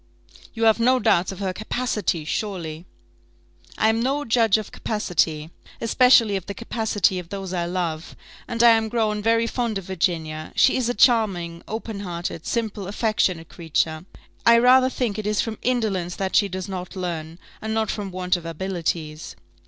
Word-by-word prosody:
"You 225 - -2
have 220 0 +5
no 255 +3 +4
doubts 185 -6 +2
of 190 - -8
her 190 -1 -2
capacity, 210 -6 -2
surely?" 170 -3 -4 0.9
"I 220 - +3
am 220 +1 +2
no 280 +4 0
judge 225 -2 +3
of 215 - -6
capacity, 165 -7 -1 0.3
especially 230 -2 +4
of 190 -2 -4
the 200 - -5
capacity 215 -5 0
of 170 -2 -10
those 195 -2 -5
I 170 -1 -1
love; 170 -3 -3 0.3
and 235 0 0
I 235 - +9
am 225 -1 +2
grown 215 -2 0
very 230 +1 +2
fond 230 -2 -2
of 195 - -6
Virginia; 165 -4 -2
she 265 - +4
is 250 -2 0
a 245 - -1
charming, 195 -8 +2
open 220 -1 -5
hearted, 175 -3 -5
simple, 215 -4 -2
affectionate 195 -6 0
creature. 160 0 -2 0.4
I 235 0 +7
rather 255 +2 +6
think 230 -5 -2
it 210 - -3
is 210 0 0
from 220 -2 -2
indolence 210 -8 -1
that 190 -1 -2
she 205 - +5
does 185 0 -5
not 185 0 -6
learn, 170 -3 -4 0.2
and 220 - -4
not 220 -2 0
from 205 -2 -4
want 180 0 0
of 175 - -5
abilities." 165 -2 -4
200 Hz, 175 wpm, -23 LUFS, 175-225 Hz, 0.9 s, I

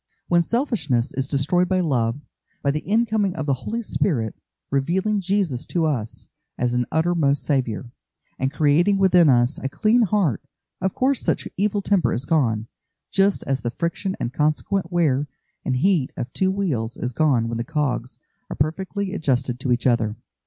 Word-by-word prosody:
When 175 0 +4
selfishness 170 - 0
is 135 +1 -1
destroyed 155 +6 +2
by 185 -1 +2
love, 125 -7 0 0.4
by 140 - +2
the 150 - -1
incoming 215 0 +1
of 155 - -3
the 140 - +2
Holy 220 - -4
Spirit, 120 - -1 0.4
revealing 185 +9 +1
Jesus 185 -9 0
to 170 -2 0
us 125 -8 -3 0.3
as 125 0 0
an 125 0 0
uttermost 160 -3 +1
Saviour, 125 - -1 0.5
and 135 +1 0
creating 160 +7 +3
within 180 -4 +5
us 120 +2 +3
a 135 - -3
clean 220 - +2
heart, 200 - +1 0.4
of 190 0 -1
course 265 0 +1
such - - 0
evil 205 +1 0
temper 195 -4 +2
is 125 - -2
gone, 115 -9 +1 0.5
just 195 0 +2
as 135 -1 -1
the 120 - -2
friction 170 - -3
and 120 - -3
consequent 160 +5 0
wear 150 -5 +1 0.4
and 130 - -1
heat 160 -1 +2
of 125 +2 -5
two 190 - +1
wheels 155 - -2
is 125 0 -3
gone 130 -5 +2
when 115 0 -3
the - - -1
cogs 135 -4 -2 0.3
are - - -5
perfectly 190 +6 -2
adjusted 130 -7 0
to 130 -1 -2
each 120 0 +1
other. 115 -4 +2
150 Hz, 170 wpm, -23 LUFS, 125-190 Hz, 0.5 s, within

